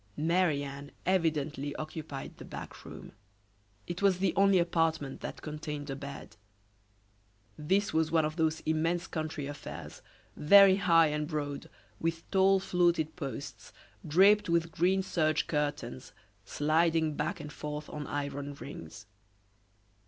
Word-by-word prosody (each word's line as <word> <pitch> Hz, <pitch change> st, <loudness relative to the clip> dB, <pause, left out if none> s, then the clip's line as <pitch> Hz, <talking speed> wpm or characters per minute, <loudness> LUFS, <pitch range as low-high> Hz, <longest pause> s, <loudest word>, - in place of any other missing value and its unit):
Marie 160 Hz, -2 st, +2 dB
Anne 140 Hz, 0 st, -7 dB, 0.2 s
evidently 155 Hz, -5 st, 0 dB
occupied 155 Hz, -3 st, -6 dB
the -, -, -10 dB
back -, -, -9 dB
room. -, -, -10 dB, 0.7 s
It 175 Hz, +1 st, -5 dB
was 195 Hz, -2 st, +4 dB
the 190 Hz, -1 st, +1 dB
only 195 Hz, -1 st, +5 dB
apartment 165 Hz, -5 st, 0 dB
that -, -, -7 dB
contained 150 Hz, -1 st, -5 dB
a -, -, -3 dB
bed. 140 Hz, -5 st, -9 dB, 1.2 s
This 190 Hz, +7 st, 0 dB
was 160 Hz, 0 st, +2 dB
one 160 Hz, -2 st, +3 dB
of 155 Hz, 0 st, -3 dB
those 160 Hz, -1 st, 0 dB
immense 165 Hz, +3 st, 0 dB
country 155 Hz, -4 st, -4 dB
affairs, 145 Hz, +1 st, -8 dB, 0.3 s
very 195 Hz, +4 st, +7 dB
high 165 Hz, -4 st, +5 dB
and 150 Hz, 0 st, -2 dB
broad, 145 Hz, -3 st, -4 dB, 0.3 s
with 165 Hz, 0 st, -2 dB
tall 195 Hz, 0 st, +4 dB
fluted 175 Hz, -4 st, +1 dB
posts, 140 Hz, -, -7 dB, 0.3 s
draped 195 Hz, +5 st, +5 dB
with 170 Hz, -1 st, +1 dB
green 185 Hz, +4 st, +2 dB
serge 155 Hz, -4 st, +1 dB
curtains, 145 Hz, -6 st, -3 dB, 0.3 s
sliding 160 Hz, -, +2 dB
back 150 Hz, +1 st, -2 dB
and 150 Hz, -, -8 dB
forth 150 Hz, 0 st, -5 dB
on 150 Hz, -1 st, -6 dB
iron 145 Hz, 0 st, -4 dB
rings. 105 Hz, -, -9 dB
155 Hz, 130 wpm, -30 LUFS, 145-175 Hz, 1.2 s, very